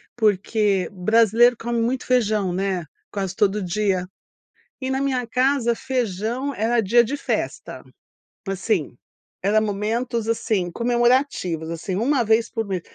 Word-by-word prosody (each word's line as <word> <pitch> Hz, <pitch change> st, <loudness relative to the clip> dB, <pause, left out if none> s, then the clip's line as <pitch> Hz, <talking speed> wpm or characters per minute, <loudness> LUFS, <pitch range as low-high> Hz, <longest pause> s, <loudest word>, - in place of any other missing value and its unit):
porque 210 Hz, -3 st, +1 dB
brasileiro 225 Hz, +5 st, +4 dB
come 235 Hz, 0 st, -2 dB
muito 245 Hz, +2 st, -1 dB
feijão, 215 Hz, -7 st, +1 dB
né, 190 Hz, -3 st, -1 dB, 0.3 s
quase 195 Hz, -2 st, -3 dB
todo 205 Hz, 0 st, +1 dB
dia, 185 Hz, 0 st, 0 dB, 0.7 s
e 260 Hz, 0 st, -3 dB
na 265 Hz, 0 st, 0 dB
minha 260 Hz, -3 st, 0 dB
casa 250 Hz, 0 st, +1 dB
feijão 245 Hz, +2 st, -2 dB
era 230 Hz, +2 st, +1 dB
dia 235 Hz, +3 st, +4 dB
de 270 Hz, +6 st, -3 dB
festa, -, -, -4 dB, 0.7 s
assim, 195 Hz, -, -1 dB, 0.5 s
era 205 Hz, +3 st, +3 dB
momentos, 220 Hz, +3 st, -2 dB
assim, 205 Hz, -5 st, 0 dB
comemorativos, 240 Hz, -, +1 dB
assim, 170 Hz, +3 st, -4 dB
1 245 Hz, +5 st, +2 dB
vez 225 Hz, +1 st, +2 dB
por 225 Hz, -1 st, -3 dB
mês, 190 Hz, -3 st, -3 dB
220 Hz, 130 wpm, -22 LUFS, 195-240 Hz, 0.7 s, brasileiro